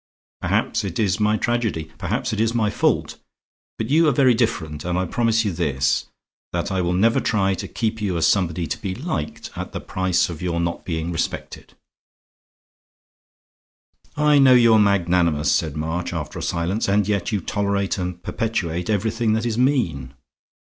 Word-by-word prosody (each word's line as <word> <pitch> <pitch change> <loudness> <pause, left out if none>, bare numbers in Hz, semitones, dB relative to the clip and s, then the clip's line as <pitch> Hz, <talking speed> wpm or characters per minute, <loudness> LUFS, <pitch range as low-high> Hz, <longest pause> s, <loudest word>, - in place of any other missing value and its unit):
Perhaps - - 0
it 95 -4 -4
is 100 -4 +1
my 105 0 +2
tragedy, 110 -10 -1
perhaps - - -2
it 110 - 0
is 115 +1 +1
my 105 -3 +1
fault. - - 0 0.6
But 110 +4 -3
you 160 +2 +5
are - - +5
very 130 -1 +4
different, 85 -11 -1
and 90 0 -1
I 90 - 0
promise 115 +3 +1
you 100 - 0
this: 75 -6 0 0.5
that - - -2
I 95 -1 0
will 90 0 0
never 110 +6 +3
try 95 -3 +1
to - - -5
keep 110 -1 -2
you 95 -4 -1
as 80 - +2
somebody 85 -3 +1
to - - -5
be 95 -2 -3
liked, 125 - -4
at - - -6
the - - -3
price 95 -1 0
of 85 -3 -7
your 85 -2 -1
not 85 0 -3
being 80 -1 -3
respected." 80 - -4 2.4
"I 150 -1 +4
know 130 -2 +7
you 115 -2 +6
are 110 - +6
magnanimous," 85 -7 +2
said 80 -2 0
March 80 +3 -3
after 75 -3 -5
a - - -5
silence, 90 +6 -1
"and 100 0 +2
yet 100 0 -1
you 105 - 0
tolerate 100 0 -1
and 90 -1 -4
perpetuate 90 -5 -2
everything 110 +2 +1
that 110 +1 0
is 115 0 -1
mean." 85 - 0
95 Hz, 175 wpm, -22 LUFS, 85-115 Hz, 2.4 s, know